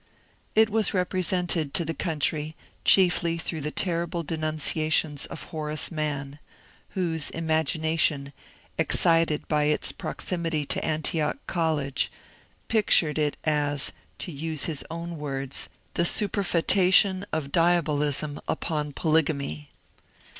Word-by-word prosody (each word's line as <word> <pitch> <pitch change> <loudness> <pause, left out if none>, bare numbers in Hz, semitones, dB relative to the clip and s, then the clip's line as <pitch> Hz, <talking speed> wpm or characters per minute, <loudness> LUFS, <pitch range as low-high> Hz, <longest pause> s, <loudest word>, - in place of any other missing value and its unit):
It 220 0 +5
was 220 -2 +1
represented 180 -4 0
to 170 - +1
the 165 - -2
country 155 -1 -1 0.3
chiefly 175 -3 +4
through 165 -1 -3
the 150 - -2
terrible 170 0 -1
denunciations 155 -1 0
of - - -8
Horace 155 0 -3
Mann, 145 -3 -3 0.6
whose 165 -5 -1
imagination, 160 -2 0 0.5
excited 165 -2 +3
by 150 -1 +1
its 150 0 +2
proximity 165 -4 -3
to - - -1
Antioch 155 - 0
College, 155 -6 -1 0.6
pictured 170 -8 +3
it 150 -1 0
as, 145 -2 0 0.3
to 180 - -5
use 155 0 -3
his 155 -4 -3
own 170 0 -6
words, 135 -2 -4 0.2
^' - - -39
the - - 0
superfcetation 190 0 +3
of 150 -3 -3
diabolism 150 -4 +2
upon 150 -3 -2
polygamy." 140 - 0
160 Hz, 110 wpm, -26 LUFS, 150-170 Hz, 0.6 s, It